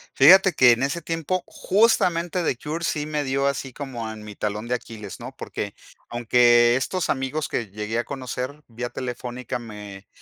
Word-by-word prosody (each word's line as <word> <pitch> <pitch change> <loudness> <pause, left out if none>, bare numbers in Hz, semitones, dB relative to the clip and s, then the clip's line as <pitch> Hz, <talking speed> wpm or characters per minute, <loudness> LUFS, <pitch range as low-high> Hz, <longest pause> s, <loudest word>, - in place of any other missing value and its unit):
Fíjate 185 +6 +8
que 125 -5 +7
en 120 +3 +2
ese 140 +5 -1
tiempo, 165 +2 -2
justamente 180 -4 +2
The 130 - +1
Cure 160 +5 -4
sí 150 -2 -1
me 150 -1 -1
dio 140 +1 0
así 135 -2 -2
como 120 -6 -5
en 110 -1 -9
mi 105 -1 -9
talón 105 +2 -3
de 125 - +1
Aquiles, 110 -5 -8
¿no? - - -8
Porque, - - -5 0.3
aunque 120 0 +5
estos 175 +7 -1
amigos 130 +3 -1
que 115 - -2
llegué 105 +3 -3
a - - 0
conocer 135 +2 -5
vía 120 +1 -5
telefónica 125 -1 -5
me 105 -4 -10
130 Hz, 175 wpm, -24 LUFS, 115-150 Hz, 0.3 s, Fíjate